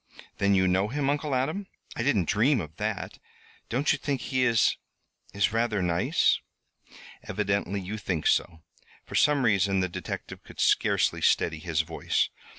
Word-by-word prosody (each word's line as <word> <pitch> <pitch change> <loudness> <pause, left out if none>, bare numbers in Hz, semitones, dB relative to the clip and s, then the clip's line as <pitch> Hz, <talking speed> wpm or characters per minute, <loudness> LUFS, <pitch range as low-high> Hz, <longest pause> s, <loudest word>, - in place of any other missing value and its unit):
Then 100 0 +3
you 95 0 +3
know 95 +2 +2
him, 140 +4 0
Uncle 145 -1 -1
Adam? 155 +10 -1 0.3
I - - -3
didn't 110 - +1
dream 120 +6 +3
of 80 -3 -8
that. - - -4 0.5
Don't 130 +7 +1
you 145 - 0
think 140 -3 -2
he 130 -1 0
is 115 -3 +3 0.6
is 100 +2 0
rather 115 -4 0
nice?" 85 -1 +2 0.8
"Evidently 100 -1 -1
you 100 +3 -5
think 90 -6 -3
so." 80 -1 +1 0.4
For - - -12
some 145 -3 +3
reason 100 -3 +2
the 95 - +1
detective 90 -1 -7
could - - -14
scarcely - - +2
steady 80 -1 +2
his 80 -1 0
voice. 80 0 -1
100 Hz, 155 wpm, -27 LUFS, 95-130 Hz, 0.8 s, Then